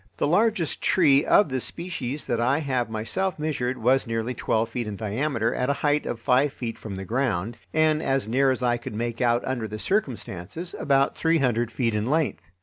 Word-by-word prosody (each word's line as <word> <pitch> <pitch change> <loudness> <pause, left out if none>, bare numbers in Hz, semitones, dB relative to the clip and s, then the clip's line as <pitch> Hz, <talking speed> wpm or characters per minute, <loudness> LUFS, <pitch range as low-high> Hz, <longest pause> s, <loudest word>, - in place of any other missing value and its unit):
The - - +1
largest 195 +1 +1
tree 145 -6 +4
of 205 - +4
this 130 -2 -1
species 150 -6 -4
that 120 -1 -1
I 130 +4 +2
have 130 -6 -1
myself 115 - -2
measured 135 -5 -2
was 130 +3 +2
nearly 115 +2 -2
twelve 110 -1 0
feet 120 -1 -3
in 105 - -4
diameter 115 +3 -1
at 125 - -1
a - - +3
height 145 +1 +2
of 115 - -3
five 130 +5 +3
feet 115 -2 -5
from 105 -3 -6
the 95 0 -6
ground, 115 -2 -1 0.2
and, 155 0 +2
as 135 -5 0
near 135 +4 +3
as 130 -1 0
I 120 -1 +2
could 120 -2 -7
make 120 +2 -3
out 120 0 +2
under 125 -4 -2
the 110 +1 -6
circumstances, 135 - -3
about 135 -1 +2
three 165 0 +2
hundred 120 -4 +1
feet 120 -3 0
in 105 +1 -1
length. 150 - -1
125 Hz, 205 wpm, -25 LUFS, 115-145 Hz, 0.2 s, tree